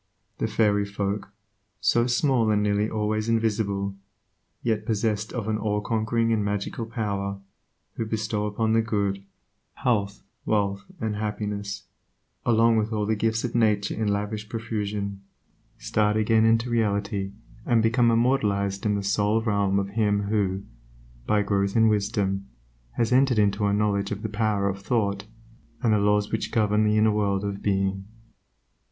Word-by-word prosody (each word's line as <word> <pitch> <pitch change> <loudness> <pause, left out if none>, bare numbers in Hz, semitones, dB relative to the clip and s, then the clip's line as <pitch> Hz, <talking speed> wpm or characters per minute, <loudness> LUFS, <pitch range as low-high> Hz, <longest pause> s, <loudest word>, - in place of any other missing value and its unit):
The - - 0
fairy 105 -2 +2
folk, 100 0 -3 0.5
so 120 +1 +2
small 120 -2 +2
and 105 -1 +2
nearly 105 +1 +1
always 110 0 -1
invisible, 105 -3 0 0.7
yet 110 -2 0
possessed 110 0 -1
of 115 -4 -4
an 110 -1 0
all 105 -1 0
conquering 115 +1 0
and 105 -2 +1
magical 105 +3 -3
power, 100 -3 -3 0.6
who 115 - -2
bestow 105 -1 -1
upon 110 +2 0
the 115 - +4
good, 100 -3 -1 0.5
health, 105 -5 -1 0.2
wealth, 100 -2 0
and 110 -2 -2
happiness, 105 -1 -3 0.6
along 115 0 +4
with 110 +1 0
all 105 -1 0
the 110 +1 +1
gifts 115 +1 0
of 120 -2 -3
nature 105 -3 +2
in 110 -1 -2
lavish 105 +1 -2
profusion, 105 -3 -3 0.6
start 105 0 +1
again 110 +1 +3
into 115 +2 +2
reality 100 -3 0 0.3
and 115 -2 +2
become 115 +1 +3
immortalized 105 -5 +1
in 105 - +2
the 100 - -2
soul 105 +2 +2
realm 100 -3 +1
of 100 0 -1
him 105 -1 +1
who, 100 -2 0 0.6
by 105 -1 +3
growth 100 -1 0
in 115 -1 +5
wisdom, 100 -2 0 0.5
has 115 - 0
entered 130 -1 +4
into 105 0 +2
a - - +1
knowledge 100 -1 +1
of 105 0 -5
the 110 - -2
power 105 -2 0
of 95 0 -3
thought, 100 -2 -1 0.6
and 115 -3 +3
the 105 - +3
laws 105 0 +2
which 110 - -2
govern 105 -1 +2
the 105 0 +2
inner 110 0 +4
world 100 -2 0
of 100 -1 -4
being. 95 -1 0
105 Hz, 155 wpm, -25 LUFS, 100-110 Hz, 0.7 s, in